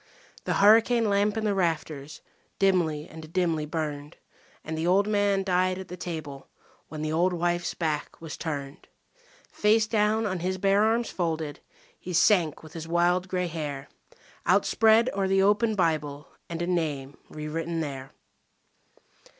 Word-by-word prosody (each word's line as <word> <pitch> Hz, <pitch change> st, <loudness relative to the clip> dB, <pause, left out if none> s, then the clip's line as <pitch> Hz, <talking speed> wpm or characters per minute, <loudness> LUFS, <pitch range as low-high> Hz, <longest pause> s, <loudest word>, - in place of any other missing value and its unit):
The -, -, 0 dB
hurricane 225 Hz, +3 st, +5 dB
lamp 205 Hz, +1 st, +1 dB
in 220 Hz, -, -1 dB
the 205 Hz, -, +2 dB
rafters 155 Hz, -5 st, -2 dB, 0.4 s
dimly 170 Hz, -6 st, +1 dB
and 160 Hz, -1 st, -11 dB
dimly 165 Hz, -4 st, 0 dB
burned; 150 Hz, -2 st, -4 dB, 0.5 s
And 160 Hz, -, -5 dB
the 160 Hz, +2 st, -2 dB
old 195 Hz, +3 st, +4 dB
man 205 Hz, -2 st, +1 dB
died 185 Hz, 0 st, +1 dB
at 190 Hz, -, -8 dB
the 180 Hz, -, -6 dB
table 155 Hz, -6 st, -7 dB, 0.4 s
when 155 Hz, -1 st, -6 dB
the 155 Hz, -, -2 dB
old 180 Hz, +3 st, +2 dB
wife's 175 Hz, 0 st, -1 dB
back 155 Hz, -3 st, -3 dB
was 160 Hz, -2 st, -7 dB
turned. 145 Hz, -3 st, -6 dB, 0.6 s
Face 215 Hz, +1 st, +3 dB
down 215 Hz, 0 st, +1 dB
on 190 Hz, -3 st, -2 dB
his 185 Hz, +2 st, -2 dB
bare 195 Hz, +2 st, +3 dB
arms 230 Hz, +2 st, +1 dB
folded 160 Hz, -4 st, -3 dB, 0.4 s
he 180 Hz, -, -7 dB
sank 175 Hz, -4 st, +3 dB
with 155 Hz, +1 st, -13 dB
his 165 Hz, -2 st, -7 dB
wild 175 Hz, +2 st, +2 dB
grey 180 Hz, -1 st, -1 dB
hair 150 Hz, -5 st, -5 dB, 0.6 s
Outspread 225 Hz, +2 st, +4 dB
o'er 195 Hz, -1 st, 0 dB
the 195 Hz, 0 st, +3 dB
open 210 Hz, +2 st, +2 dB
Bible 150 Hz, -5 st, -1 dB, 0.2 s
and 170 Hz, 0 st, -3 dB
a -, -, 0 dB
name 150 Hz, -6 st, -2 dB
re 150 Hz, 0 st, -7 dB
written 165 Hz, +2 st, -3 dB
there. 135 Hz, -4 st, -5 dB
175 Hz, 155 wpm, -27 LUFS, 155-195 Hz, 0.6 s, hurricane